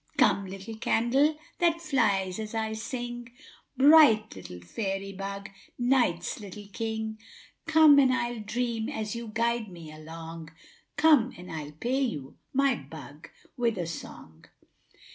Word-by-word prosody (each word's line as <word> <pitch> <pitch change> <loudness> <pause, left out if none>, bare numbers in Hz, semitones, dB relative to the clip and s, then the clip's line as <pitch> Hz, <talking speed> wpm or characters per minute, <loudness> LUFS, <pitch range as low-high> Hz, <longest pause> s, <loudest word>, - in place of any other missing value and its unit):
= - - -31
```Come, 205 -7 +3
little 195 +4 -8
candle, 265 +7 +2 0.2
that 335 -1 +3
flies 215 - +1
as 215 +1 -5
I 220 -1 -1
sing, 240 +1 -5 0.5
```Bright 280 - +6
little 90 -1 -9
fairy 195 - -4
bug, 195 0 -6 0.3
night's 245 -10 +1
little 205 0 -9
king; 220 0 -3 0.5
```Come 310 -3 +7
and 260 -2 +4
I'll 240 -2 -1
dream, 230 +2 -2
as 220 -6 -4
you 235 0 -5
guide 235 -1 0
me 170 -4 -10
along; 160 +1 -9 0.5
```Come 290 -6 +4
and 180 +1 -10
I'll 150 -2 -6
pay 245 - -1
you, 150 - -3 0.2
my 275 0 +3
bug, 145 - -10 0.3
with 235 -3 0
a 175 - -2
song. 80 - -9
220 Hz, 140 wpm, -28 LUFS, 185-245 Hz, 0.5 s, ```Come